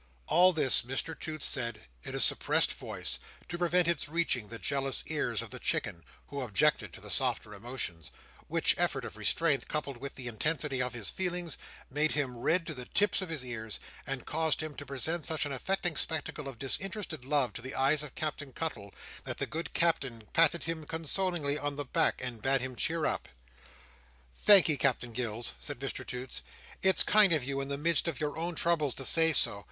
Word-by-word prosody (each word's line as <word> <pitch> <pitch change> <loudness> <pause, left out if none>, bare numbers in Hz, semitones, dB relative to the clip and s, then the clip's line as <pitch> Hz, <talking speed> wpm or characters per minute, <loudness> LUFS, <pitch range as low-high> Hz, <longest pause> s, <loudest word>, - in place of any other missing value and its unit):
All 180 +2 +5
this, 150 -6 +4
Mr 135 +6 -2
Toots 155 -2 -6
said 120 -4 -1 0.2
in - - -7
a - - -2
suppressed - - +3
voice, - - -2 0.3
to - - -5
prevent 175 0 +2
its 165 -3 +1
reaching 155 -9 0
the 115 - -6
jealous 135 +1 +1
ears - - -1
of - - -11
the - - -5
Chicken, 85 - -2 0.3
who 140 -1 -5
objected 130 +5 +2
to - - -10
the - - -5
softer 105 - 0
emotions; 100 - -4 0.4
which - - +4
effort - - +1
of - - -8
restraint, 155 -5 +1
coupled 145 -4 -2
with 140 +3 -7
the 130 - -6
intensity 140 +3 -1
of 125 -1 -2
his 110 -4 +1
feelings, 175 -4 0 0.4
made 150 +3 +1
him 135 -4 -1
red 165 +7 +1
to 165 - -4
the 125 -3 -7
tips 205 -1 +1
of 185 - -5
his 150 -6 -1
ears, 110 -3 -4 0.3
and 135 -2 -3
caused 160 0 +1
him 155 -1 -6
to 145 - -8
present 155 +5 +1
such 160 -2 0
an 145 - -4
affecting 175 +5 -1
spectacle 150 -1 -3
of 135 -3 -7
disinterested 165 - -2
love 135 -4 +1
to - - -4
the 130 +2 -7
eyes 140 +3 +3
of 150 -2 -8
Captain 150 -3 -4
Cuttle, 115 -11 -5 0.3
that - - -5
the - - -1
good 165 +2 -5
Captain 135 -9 0
patted 165 +1 +4
him 160 -2 -4
consolingly 160 -2 -1
on 145 0 -3
the 145 0 -4
back, - - +1
and 120 -3 -5
bade 135 +2 +2
him 130 0 -4
cheer 160 +5 0
up. - - -2 1.0
"Thankee, 175 - +6
Captain 125 -3 0
Gills," 115 -1 -2
said 145 - -4
Mr 135 +1 -4
Toots, 125 - -6 0.4
"it's 190 0 +8
kind 210 -3 +6
of 155 -5 +3
you, 140 +1 -2
in 135 - -5
the 140 0 -3
midst 165 +1 +1
of 165 -5 -3
your 150 -1 -2
own 170 +1 -3
troubles, 160 -6 +1
to 135 - -4
say 165 +4 +6
so. 100 -8 +2
145 Hz, 200 wpm, -30 LUFS, 130-165 Hz, 1.0 s, it's